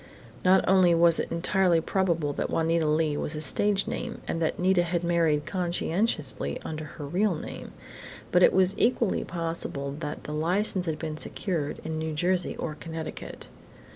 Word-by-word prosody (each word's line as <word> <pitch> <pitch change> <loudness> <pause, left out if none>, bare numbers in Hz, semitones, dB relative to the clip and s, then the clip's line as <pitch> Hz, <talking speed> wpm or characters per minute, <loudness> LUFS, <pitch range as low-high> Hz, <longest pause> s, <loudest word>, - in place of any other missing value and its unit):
Not 185 +1 +4
only 185 -2 +5
was 170 0 +5
it - - -3
entirely 175 0 +2
probable 165 -4 0
that - - -2
Juanita 165 0 +1
Leigh 155 -1 +1
was 155 - -2
a - - -3
stage 200 +5 +2
name - - -4
and 165 - -2
that 160 - 0
Nita 185 0 +3
had 175 0 -1
married 165 -4 +2
conscientiously 170 - -1
under 155 -1 -5
her 150 0 -8
real 185 +5 +1
name, - - -8 0.6
but 180 - +4
it - - +7
was 190 0 +3
equally 230 -3 +2
possible 165 -5 -3
that 150 -2 -5
the 150 - -6
license 180 +4 +1
had 155 -1 -1
been 155 -2 -5
secured 160 -4 -2
in 160 0 -3
New 160 0 -3
Jersey 180 +3 0
or 155 - -3
Connecticut. 160 +1 -7
165 Hz, 170 wpm, -27 LUFS, 155-185 Hz, 0.6 s, it